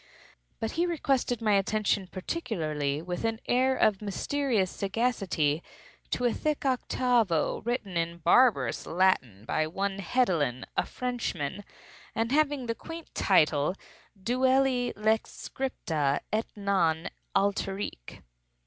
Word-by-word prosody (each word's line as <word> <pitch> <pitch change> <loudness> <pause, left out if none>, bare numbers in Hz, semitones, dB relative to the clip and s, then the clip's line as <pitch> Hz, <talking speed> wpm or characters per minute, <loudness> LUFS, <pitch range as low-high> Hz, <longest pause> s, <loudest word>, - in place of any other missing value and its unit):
But 225 - -2
he 345 +2 +1
requested 270 -7 0
my 210 -2 +3
attention 200 -1 +1
particularly, 165 - -2
and 160 +4 -8
with 180 +2 -3
an 225 -1 0
air 260 +2 +3
of 215 -2 +3
mysterious 215 0 0
sagacity, 195 -8 0 0.5
to 245 - -1
a 240 - +3
thick 305 -2 -2
octavo, 245 - +1
written 235 -5 -3
in 170 0 -1
barbarous 170 - +3
Latin 150 - +1
by 155 +6 0
one 195 +4 -2
Hedelin, 170 - +1
a - - +1
Frenchman, 225 - -3 0.5
and 225 +1 0
having 290 -3 +2
the 230 - -1
quaint 330 +6 -9
title, 155 -2 +3 0.4
"Duelli 255 +3 +2
Lex 220 +1 +1
Scripta, 155 - -2
et 220 +1 +1
non; 185 -6 +1 0.3
aliterque." 195 - -2
205 Hz, 120 wpm, -28 LUFS, 170-250 Hz, 0.5 s, my